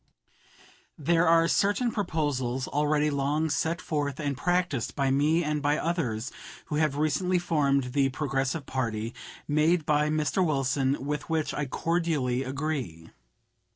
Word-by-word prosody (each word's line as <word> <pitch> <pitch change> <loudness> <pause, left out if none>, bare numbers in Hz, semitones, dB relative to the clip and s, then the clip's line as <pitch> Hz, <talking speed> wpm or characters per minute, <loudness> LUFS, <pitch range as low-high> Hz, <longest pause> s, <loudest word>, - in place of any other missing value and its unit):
There 165 +3 +2
are 165 0 +5
certain 205 +7 +2
proposals 145 - -1
(already 150 +1 +1
long 145 +3 0
set 165 +3 0
forth 145 -3 -2
and 145 -2 -1
practiced 175 -4 -1
by 135 -2 +1
me 150 +5 +2
and 150 -1 -1
by 145 +1 +2
others 135 -9 -2 0.3
who 150 - -3
have 150 -2 +1
recently 155 +5 +1
formed 140 -7 +1
the 140 -1 +3
Progressive 135 +1 -2
party) 115 -3 -2 0.3
made 155 +2 +2
by 150 0 +2
Mr. 155 +4 +1
Wilson 135 -3 0
with 150 +2 -3
which 160 -2 0
I 150 -1 -2
cordially 155 -5 0
agree. 135 - -4
150 Hz, 135 wpm, -27 LUFS, 135-160 Hz, 0.3 s, are